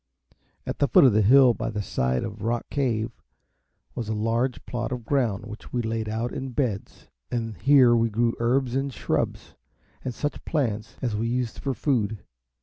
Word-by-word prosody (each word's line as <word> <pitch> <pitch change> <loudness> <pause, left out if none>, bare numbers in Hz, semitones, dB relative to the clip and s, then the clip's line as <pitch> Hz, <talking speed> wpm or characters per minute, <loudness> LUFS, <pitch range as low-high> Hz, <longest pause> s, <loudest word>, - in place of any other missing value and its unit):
At - - -4
the 140 - +3
foot - - +6
of 130 -5 +6
the 110 - +4
hill 125 +4 +7
by - - -3
the 105 -1 -3
side 65 -7 0
of 110 -1 -6
Rock 115 +2 -2
Cave 120 -5 0 0.8
was 115 -3 -4
a 110 - -1
large 115 +4 -1
plot 120 -2 -3
of 125 -3 -4
ground, 120 -7 0
which 110 0 -10
we 120 -1 -1
laid 110 -1 -2
out 115 +3 -2
in 130 -1 -5
beds, 115 -8 -3 0.2
and 115 -3 -3
here 130 -4 +6
we 115 0 +2
grew 115 +2 +1
herbs 120 +1 +1
and 135 +1 -1
shrubs, - - -2 0.5
and 130 - -2
such 145 +4 -4
plants 115 -8 -2
as 120 -4 0
we 110 +2 -1
used 120 -1 -2
for 135 -2 -2
food. 110 - 0
115 Hz, 185 wpm, -25 LUFS, 110-130 Hz, 0.8 s, hill